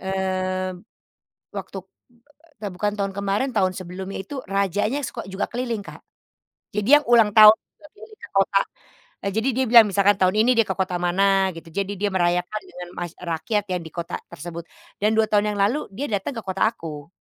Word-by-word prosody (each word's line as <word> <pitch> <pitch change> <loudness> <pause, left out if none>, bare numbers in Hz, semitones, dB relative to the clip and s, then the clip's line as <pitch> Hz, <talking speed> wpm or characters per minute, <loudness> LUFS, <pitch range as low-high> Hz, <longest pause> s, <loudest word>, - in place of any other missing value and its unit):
mmm, 185 -1 -2 0.7
waktu, 195 - -6
eee, 190 - -51 0.6
ta - - -1
bukan 205 +3 -1
tahun 195 -1 -1
kemarin, 200 +6 0
tahun 185 -2 +3
sebelumnya 185 +1 -6
itu 270 +6 -6
rajanya 200 +7 0
suko 235 - -6
juga 190 +1 -2
keliling, 235 -3 -3
Kak. - - -11 0.7
Jadi 210 +1 -1
yang - - -14
ulang 230 -3 +5
tahun 215 0 +10 0.4
keliling 430 0 -14
ke - - -9
kota, 195 0 +3 0.6
eee, 200 - 0
jadi 225 +4 +1
dia 260 - +2
bilang 230 -3 +9
misalkan 200 +1 +4
tahun 185 0 +3
ini 240 - +4
dia 230 - +4
ke 190 - -2
kota 185 -1 0
mana 180 +2 +1 0.3
gitu, 165 0 -10
jadi 200 0 -1
dia 205 0 +1
merayakan 180 +3 0
dengan 180 0 -9
mass 175 -2 -4
eee, 180 - -11
rakyat 195 +6 -1
ya 180 - 0
di 160 - -10
kota 170 -1 -5 0.2
tersebut 170 +1 -7 0.4
dan 210 +1 +3
2 220 0 +4
tahun 210 0 +2
yang - - -5
lalu 220 +9 +2 0.2
dia 280 +7 -3
datang 205 +6 -2
ke - - -5
kota 190 0 -2
aku 155 -8 -9
195 Hz, 190 wpm, -23 LUFS, 185-215 Hz, 0.7 s, tahun